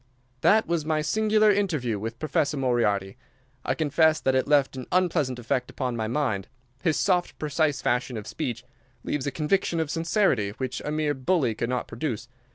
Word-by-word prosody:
"That 220 +8 +5
was 170 -2 -1
my 155 0 0
singular 215 +4 +3
interview 155 - 0
with 115 +2 -5
Professor 155 0 0
Moriarty. 115 -6 0 0.5
I - - 0
confess 160 +1 +3
that 130 - +1
it 130 0 +1
left 145 -2 +3
an 130 -1 -7
unpleasant 165 -8 +1
effect 125 +1 -2
upon 125 -3 -3
my 110 -1 -2
mind. 115 -6 -1 0.3
His 160 -4 +1
soft, 180 -2 +1
precise 150 -1 0
fashion 125 0 0
of 105 - -6
speech 125 -4 -4 0.4
leaves 145 -2 -2
a - - 0
conviction 165 +4 0
of 160 -2 -1
sincerity 165 - +1
which 130 -1 -3
a - - -3
mere 150 -1 0
bully 130 -2 +1
could 120 +2 -3
not 125 -1 -2
produce. 120 -1 -4
145 Hz, 175 wpm, -26 LUFS, 125-160 Hz, 0.5 s, That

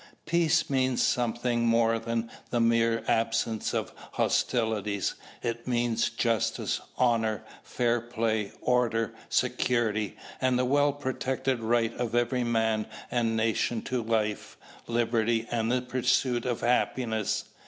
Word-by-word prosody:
Peace 165 -1 +2
means 130 -2 +1
something 120 0 +1
more 115 0 +3
than 115 0 -3 0.2
the 120 - 0
mere 115 -1 +2
absence 115 -1 0
of - - -2 0.2
hostilities. 105 -4 0 0.3
It 115 0 -3
means 120 -2 +1
justice, 115 -3 0 0.2
honour, 115 -3 +1 0.2
fair 120 -1 0
play, 110 -3 -1
order, 120 -3 +1 0.2
security, 110 -4 0 0.2
and 130 -1 +2
the 125 - +2
well 145 +2 +3
protected 130 -2 -2
right 115 0 +1
of 120 -1 -2
every 120 +1 +1
man 110 -2 +1 0.2
and 115 -2 +1
nation 110 +1 0
to 125 -1 -1
life, 110 -2 -1 0.3
liberty, 115 -1 +1
and 115 -1 0
the 125 0 +1
pursuit 125 -1 +1
of 120 -2 -1
happiness. 120 -3 0
115 Hz, 120 wpm, -28 LUFS, 115-125 Hz, 0.3 s, more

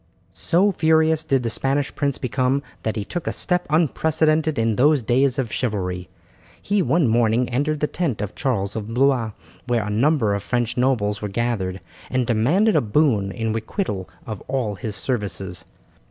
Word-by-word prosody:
So 190 +5 +2
furious 160 -2 +3
did 135 -5 +1
the 115 - -1
Spanish 135 +4 -1
prince 140 -2 -1
become 130 +2 0 0.2
that 110 - -2
he 105 -3 -3
took 175 +8 -5
a - - +1
step 180 0 0
unprecedented 155 0 +2
in 115 -1 +1
those 145 +1 +3
days 130 +3 +2
of 125 -5 -2
chivalry. 90 -7 -2 0.5
He 205 0 0
one 150 0 +2
morning 115 +1 +2
entered 145 +4 -1
the - - +3
tent 150 - -2
of 105 -1 -4
Charles 100 -8 -1
of 110 +1 -5
Blois, 125 -4 +2 0.3
where 120 -4 +1
a 105 - -3
number 115 -1 +2
of 100 - -1
French 120 +2 -1
nobles 115 -5 +1
were 105 - -2
gathered, 100 -4 -2 0.3
and 130 -1 0
demanded 145 - +2
a - - +4
boon 110 -4 +2
in 115 +1 -2
requital 110 - -3 0.2
of 110 -3 -6
all 130 -6 -1
his 100 +2 -5
services. 95 -6 -3
125 Hz, 170 wpm, -22 LUFS, 105-150 Hz, 0.5 s, a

